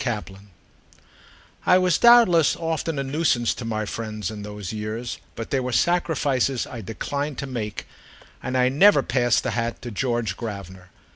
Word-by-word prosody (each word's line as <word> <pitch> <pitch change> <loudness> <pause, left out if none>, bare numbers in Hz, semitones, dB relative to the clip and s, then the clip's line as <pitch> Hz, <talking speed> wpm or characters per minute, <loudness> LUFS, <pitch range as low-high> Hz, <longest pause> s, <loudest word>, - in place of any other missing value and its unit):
V 125 - 0 1.5
I 180 - +5
WAS 180 -3 +2
doubtless 235 -10 +6
often 165 -1 -2
a 140 - -1
nuisance 135 -4 +1
to - - -8
my 110 -1 -2
friends 110 -2 -4
in 105 -1 -7
those 105 -1 -6
years; 110 +3 -4 0.2
but 115 - -6
there 135 - +1
were 125 0 -3
sacrifices 140 -3 +1
I 120 - -8
declined 140 +7 -4
to - - -4
make, 115 -6 -5 0.6
and 130 0 -2
I 125 0 +4
never 145 +3 +5
passed 120 -1 +1
the - - -1
hat 115 0 -2
to 120 - -6
George 120 -3 -1
Gravener. 95 -5 -8
125 Hz, 160 wpm, -24 LUFS, 110-145 Hz, 1.5 s, doubtless